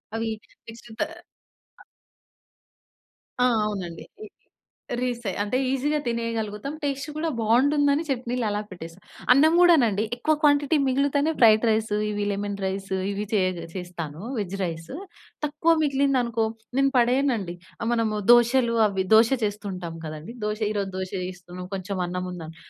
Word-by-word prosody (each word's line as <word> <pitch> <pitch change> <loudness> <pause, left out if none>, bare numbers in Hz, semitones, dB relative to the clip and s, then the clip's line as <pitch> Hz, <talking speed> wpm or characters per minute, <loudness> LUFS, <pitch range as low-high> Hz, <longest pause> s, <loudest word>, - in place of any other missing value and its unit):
అవి 225 0 -1 0.4
నెక్ట్ 230 +1 -12
తా - - +3 0.8
ఆహ్ - - -16 1.6
ఆ! - - +5 0.2
అవునండి. 185 -6 -4 0.2
రి - - -8 0.7
రీసే 240 -4 -2
అంటే 210 +5 -1
ఈజీగా 290 +3 0
తినేయగలుగుతాం 230 +1 -3
టేస్ట్ 275 0 -2
కూడా 320 +2 -1
బావుంటుందని 280 +6 +3
చట్నీలు 245 -2 -1
అలా 205 0 -1
పెట్టేస్తాం. 175 0 -10 0.3
అన్నం 305 +5 +5
కూడానండి 245 - +5
ఎక్కువ 310 +6 +1
క్వాంటిటీ 290 +1 +4
మిగిలుతేనే 280 +3 +2
ఫ్రైడ్ 220 -2 +6
రైసు 220 -1 +1
ఇవి 205 -1 -2
లెమన్ 200 0 -3
రైసు 190 0 -3 0.2
ఇవి 205 +1 -3
చేయగ 185 -4 +1
చేస్తాను. 170 -4 -6 0.2
Veg 200 -3 -3
rice. 165 +5 -5 0.5
తక్కువ 300 +3 +2
మిగిలిందనుకో 265 -5 +1 0.3
నేను 275 0 +3
పడేయనండి. 240 -7 +1 0.3
ఆహ్, 230 - -1
మనము 225 -2 0
దోషలు 240 0 +4
అవి 190 -2 -2
దోష 225 +1 +6
చేస్తుంటాం 200 -5 -4
కదండీ! 155 +9 -7
దోష 210 0 -2
ఈ - - -2
రోజు 195 -1 -3
దోష 185 0 -4
వేస్తున్నాం 180 0 -8
కొంచెం 195 +1 -4
అన్నం 180 +1 -3
ఉందని 165 -2 -8
220 Hz, 135 wpm, -25 LUFS, 190-265 Hz, 1.6 s, ఫ్రైడ్